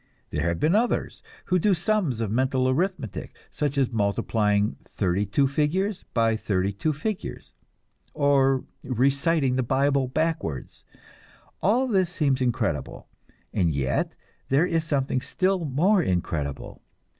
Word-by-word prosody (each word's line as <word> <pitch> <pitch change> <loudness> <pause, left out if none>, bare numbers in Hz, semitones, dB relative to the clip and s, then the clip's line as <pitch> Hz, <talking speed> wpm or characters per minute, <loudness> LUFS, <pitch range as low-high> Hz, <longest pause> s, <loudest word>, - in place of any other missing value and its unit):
There 75 +3 -1
have 85 -1 -1
been 160 +3 +2
others 230 +4 0 0.2
who 185 0 +2
do 195 +2 +3
sums 175 - 0
of 110 -3 -2
mental 130 +2 +1
arithmetic, 140 - -2 0.2
such 145 -1 -2
as 130 -3 +2
multiplying 105 -1 +1
thirty 95 +1 -1
two 135 +8 +2
figures 170 +8 -1
by 115 -1 +3
thirty 100 -2 -1
two 155 +11 -1
figures, 200 +7 -5 0.6
or 135 -3 +3 0.2
reciting 135 +2 +1
the - - +2
Bible 135 +2 +1
backwards. 155 - -2 0.8
All 235 +7 +3
this 190 -7 +2
seems 140 -6 0
incredible; 125 -2 -2 0.4
and 85 -5 +1
yet 65 -1 -1 0.3
there 140 +6 +4
is 165 -2 0
something 135 -4 0
still 185 +1 0
more 175 +9 +3
incredible. 80 - -3
135 Hz, 130 wpm, -25 LUFS, 110-165 Hz, 0.8 s, there